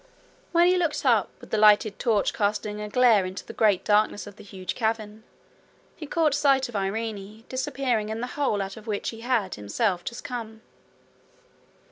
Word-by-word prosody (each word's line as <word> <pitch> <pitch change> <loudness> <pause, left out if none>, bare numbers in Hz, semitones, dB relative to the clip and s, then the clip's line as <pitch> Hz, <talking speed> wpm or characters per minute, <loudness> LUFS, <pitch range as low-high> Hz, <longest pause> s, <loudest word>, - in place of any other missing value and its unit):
When 345 0 +5
he 365 +1 +4
looked 330 -5 -1
up, 230 -7 +3
with - - -14
the 215 - +1
lighted 210 -1 +5
torch 220 -4 +1
casting 210 0 -1
a 210 - -5
glare 235 -3 +4
into 185 +1 -6
the - - -9
great 210 -4 +2
darkness 210 0 +2
of 205 -1 -11
the - - -13
huge 190 -3 -6
cavern, 220 -2 -2 0.7
he 305 - -8
caught 310 -1 +2
sight 275 -2 +3
of 240 - -11
Irene 210 +1 -4
disappearing 255 -4 -1
in 220 +1 -3
the 245 - -2
hole 220 -9 0
out 195 +2 -7
of 220 +1 -12
which 205 -2 -2
he 225 -1 -8
had 230 -6 0
himself 175 - -1
just 235 - -6
come. 225 -2 -6
220 Hz, 180 wpm, -26 LUFS, 205-245 Hz, 0.7 s, When